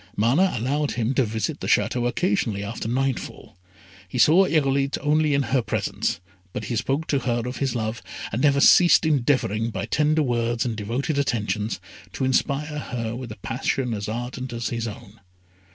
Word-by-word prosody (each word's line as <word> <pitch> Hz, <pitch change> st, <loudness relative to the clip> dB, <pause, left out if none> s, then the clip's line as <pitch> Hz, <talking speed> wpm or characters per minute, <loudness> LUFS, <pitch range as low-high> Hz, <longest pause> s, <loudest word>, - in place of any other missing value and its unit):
Mana 140 Hz, -, +3 dB
allowed 140 Hz, +6 st, -1 dB
him 120 Hz, +2 st, 0 dB
to 135 Hz, -, +3 dB
visit 110 Hz, -1 st, -2 dB
the -, -, -5 dB
Château 120 Hz, -1 st, +2 dB
occasionally 120 Hz, -, 0 dB
after 110 Hz, +2 st, -5 dB
nightfall. 130 Hz, +2 st, -3 dB, 0.5 s
He 90 Hz, -, -5 dB
saw 165 Hz, +10 st, +6 dB
Irolite 140 Hz, -3 st, +1 dB
only 150 Hz, 0 st, +2 dB
in 140 Hz, -, +2 dB
her 130 Hz, -, +4 dB
presence, 110 Hz, -, -2 dB, 0.3 s
but -, -, -4 dB
he 120 Hz, -, -3 dB
spoke 135 Hz, +8 st, -1 dB
to 140 Hz, -, +2 dB
her 120 Hz, -2 st, -1 dB
of 125 Hz, +1 st, -4 dB
his 135 Hz, -3 st, -1 dB
love, 110 Hz, 0 st, -3 dB, 0.3 s
and 115 Hz, -, -2 dB
never 140 Hz, -1 st, +4 dB
ceased 175 Hz, +3 st, +6 dB
endeavouring, 125 Hz, -7 st, +1 dB
by 100 Hz, -3 st, -4 dB
tender 155 Hz, +1 st, +2 dB
words 120 Hz, -2 st, 0 dB
and 115 Hz, -3 st, -2 dB
devoted 120 Hz, +8 st, -2 dB
attentions, 110 Hz, -5 st, -1 dB, 0.3 s
to 135 Hz, -, -1 dB
inspire 145 Hz, +3 st, 0 dB
her 115 Hz, -4 st, -4 dB
with 125 Hz, -2 st, -7 dB
a 110 Hz, -, -8 dB
passion 125 Hz, 0 st, -1 dB
as 105 Hz, -1 st, -4 dB
ardent 120 Hz, +2 st, -5 dB
as 115 Hz, 0 st, -3 dB
his 115 Hz, -1 st, -3 dB
own. 110 Hz, 0 st, -10 dB
125 Hz, 175 wpm, -24 LUFS, 115-140 Hz, 0.5 s, saw